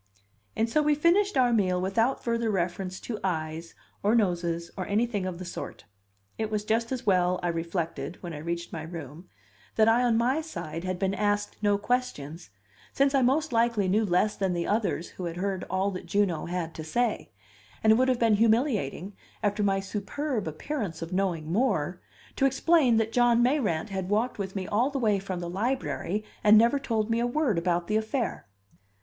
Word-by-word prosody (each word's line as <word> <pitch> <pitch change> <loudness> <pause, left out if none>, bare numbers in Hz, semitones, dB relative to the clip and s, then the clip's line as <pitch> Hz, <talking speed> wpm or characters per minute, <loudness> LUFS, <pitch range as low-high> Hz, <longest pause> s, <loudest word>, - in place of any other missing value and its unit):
And 225 - +1
so 305 +7 +2
we 300 0 +3
finished 345 +4 +3
our 245 -2 +4
meal 185 -5 +2
without 225 +8 0
further 230 -1 0
reference 185 -1 -2
to 220 -3 -5
eyes, 165 -2 -3 0.3
or 210 +3 +3
noses, 170 -5 0
or 185 -2 -4
anything 205 -2 0
of 180 -2 -4
the 185 - -7
sort. 175 - -7 0.5
It 220 -1 -1
was 210 -1 -2
just 230 +2 0
as 260 -2 -3
well, 180 -2 +3
I 175 - +1
reflected, 165 -3 -3
when 175 -2 -5
I 150 - -6
reached 170 +2 -4
my 165 - -4
room, 160 +1 -9 0.5
that 220 0 +4
I 230 +2 +5
on 240 -2 +3
my 255 +7 +2
side 165 - -6
had 185 -1 -2
been 195 +1 0
asked 205 0 -1
no 205 -1 +3
questions, 200 - -3 0.4
since 275 0 +2
I 270 - +4
most 275 +3 +2
likely 230 -4 +2
knew 210 +4 +2
less 205 +2 +2
than 190 -2 0
the 170 -1 -1
others 205 -5 -1
who 185 - -7
had 170 0 -4
heard 190 0 -2
all 190 +2 0
that 185 -2 -7
Juno 185 -3 0
had 170 -2 -3
to 160 - -7
say; 230 +8 -1 0.5
and 220 0 +6
it - - +4
would 255 +3 +3
have 255 -2 +2
been 225 -3 +3
humiliating, 215 - +1 0.3
after 205 0 +1
my 195 -1 +2
superb 210 - -3
appearance 165 - -4
of 165 +2 -7
knowing 175 -5 -1
more, 180 - 0 0.4
to 270 - +4
explain 270 -2 +3
that 225 0 +1
John 240 0 +4
Mayrant 225 - +1
had 190 -2 -4
walked 220 +3 0
with 190 -1 -4
me 190 -1 -2
all 230 +8 +1
the 280 - -3
way 215 -6 +2
from 190 -2 -5
the 175 - -4
Library, 210 0 -2 0.2
and 210 +1 +8
never 235 +6 +4
told 225 -4 -1
me 230 - +2
a 240 - +1
word 245 - +1
about 175 0 0
the 215 +4 +1
affair. 225 - -2
205 Hz, 195 wpm, -27 LUFS, 180-235 Hz, 0.5 s, and